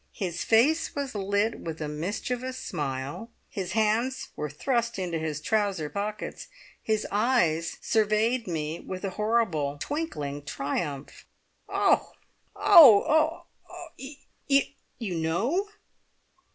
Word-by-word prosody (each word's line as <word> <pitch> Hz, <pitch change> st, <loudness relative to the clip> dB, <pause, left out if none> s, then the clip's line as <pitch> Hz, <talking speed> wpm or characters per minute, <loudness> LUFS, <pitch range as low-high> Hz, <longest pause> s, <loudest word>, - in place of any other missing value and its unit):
His 180 Hz, -3 st, -3 dB
face 285 Hz, +11 st, +3 dB
was 280 Hz, -2 st, -3 dB
lit 205 Hz, +2 st, 0 dB
with 160 Hz, -1 st, -6 dB
a 155 Hz, -, -3 dB
mischievous 235 Hz, +11 st, -3 dB
smile; 145 Hz, -, -4 dB, 0.2 s
his 190 Hz, -2 st, -4 dB
hands 225 Hz, +4 st, 0 dB
were 150 Hz, -, -3 dB
thrust 235 Hz, -, -1 dB
into 175 Hz, -3 st, -2 dB
his 155 Hz, -2 st, -3 dB
trouser 200 Hz, -6 st, 0 dB
pockets; 205 Hz, +1 st, -4 dB, 0.3 s
his 215 Hz, -1 st, 0 dB
eyes 205 Hz, -8 st, +1 dB
surveyed 220 Hz, +2 st, +1 dB
me 160 Hz, -1 st, -3 dB
with 185 Hz, 0 st, -7 dB
a 195 Hz, -, -2 dB
horrible, 195 Hz, -10 st, 0 dB
twinkling 150 Hz, -, -4 dB
triumph. 145 Hz, 0 st, -4 dB, 0.4 s
"Oh! -, -, +2 dB, 0.4 s
Oh! 315 Hz, -, +7 dB, 0.3 s
Oh! -, -, -9 dB, 1.1 s
You 200 Hz, -7 st, -4 dB
know!" 225 Hz, -, 0 dB
205 Hz, 110 wpm, -27 LUFS, 160-235 Hz, 1.1 s, Oh